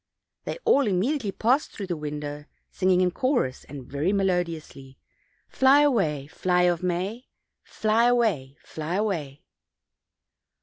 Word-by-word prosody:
They - - -4
all 280 -3 +4
immediately 210 +4 0
passed 250 +9 +1
through 200 - -7
the 180 -2 -3
window, 150 -1 -6 0.3
sing 185 - 0
ing 185 -1 +4
in 180 -1 +2
chorus 245 - -1
and 135 -2 -9
very 145 +8 -1
melodiously: 170 -8 -2 0.5
"Fly 270 +2 +4
away, 195 - +1
fly 180 +3 0
of 175 -1 +2
May; 185 +7 -3 0.4
Fly 220 +2 +1
away, 205 - +1
fly 155 +3 -5
away." 165 -10 -2
180 Hz, 130 wpm, -25 LUFS, 150-220 Hz, 0.5 s, all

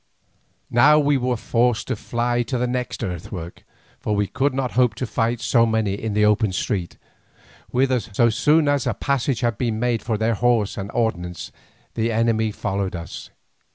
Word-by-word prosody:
Now 145 +6 +6
we 145 -1 +3
were 125 -1 -1
forced 115 0 0
to 130 - 0
fly 120 +2 -1
to 125 +2 -2
the 125 - 0
next 125 -1 -3
earthwork, 90 -2 -6 0.4
for 105 - -1
we 105 0 +1
could 140 +8 0
not 130 -1 -2
hope 125 -3 +2
to 130 - -3
fight 115 0 -1
so 120 0 +3
many 110 -3 0
in 105 +1 -3
the 105 0 +4
open 105 -1 +2
street, 90 -1 -2 0.7
whither, 130 0 +2
so 115 +2 +1
soon 150 +6 +3
as 145 -3 +1
a - - 0
passage 135 -3 -1
had 120 -4 0
been 115 -3 -1
made 120 -1 0
for 110 -2 -2
their 110 +2 +1
horse 115 -2 +1
and 100 0 -5
ordnance, 90 -7 -2 0.4
the 115 0 0
enemy 110 -1 +1
followed 100 -2 -3
us. 85 -2 -8
115 Hz, 180 wpm, -22 LUFS, 105-125 Hz, 0.7 s, Now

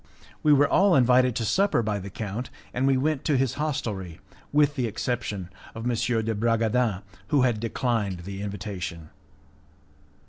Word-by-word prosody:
We 150 - +4
were 145 0 +6
all 195 +3 +4
invited 125 -1 +4
to 115 - -1
supper 195 - +2
by 105 -1 -1
the 100 +1 -7
count, 110 +4 -5 0.2
and 130 +2 +1
we 135 -1 +4
went 145 +1 0
to 145 -4 +2
his 130 -2 +1
hostelry, 105 - -3 0.3
with 145 0 +4
the 125 -4 -1
exception 105 -5 -3 0.2
of 115 +2 -4
M. 120 - +1 0.3
de 110 +1 -1
Bragadin, 115 -1 +1 0.2
who 140 0 +3
had 120 -4 +2
declined 115 -5 -1
the 95 +2 -7
invitation. 95 -5 -5
115 Hz, 160 wpm, -26 LUFS, 100-130 Hz, 0.3 s, were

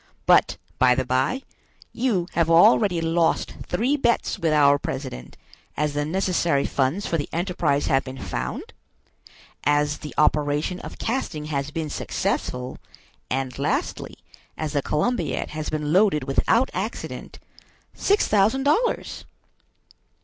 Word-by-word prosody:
"But, - - +4 0.2
by 125 -1 +5
the 130 - -1
bye, 130 - 0 0.5
you 225 -8 0
have 170 -1 +1
already 165 +2 +5
lost 165 0 +1
three 240 +10 +1
bets 235 -5 0
with 165 -3 +1
our 145 -1 +5
president, 130 - -6 0.4
as 150 -1 0
the 145 0 -1
necessary 170 -4 +1
funds 140 +9 0
for 165 - -1
the 145 - -3
enterprise 170 -5 0
have 135 0 +2
been 130 0 -8
found, 60 - -5 0.9
as 145 0 +1
the 150 - -9
operation 150 +3 +1
of - - -9
casting 220 - -3
has 140 +1 -1
been 155 -1 -4
successful, 125 0 -3 0.5
and 130 0 -3
lastly, 145 - -2 0.4
as 155 -2 -3
the 145 - +1
Columbiad 195 - -1
has 155 0 -4
been 150 0 -2
loaded 190 -7 +4
without 225 - +2
accident, 195 +5 -5 0.6
six 405 +1 +2
thousand 215 +6 +3
dollars." 435 - 0
155 Hz, 130 wpm, -24 LUFS, 140-190 Hz, 0.9 s, by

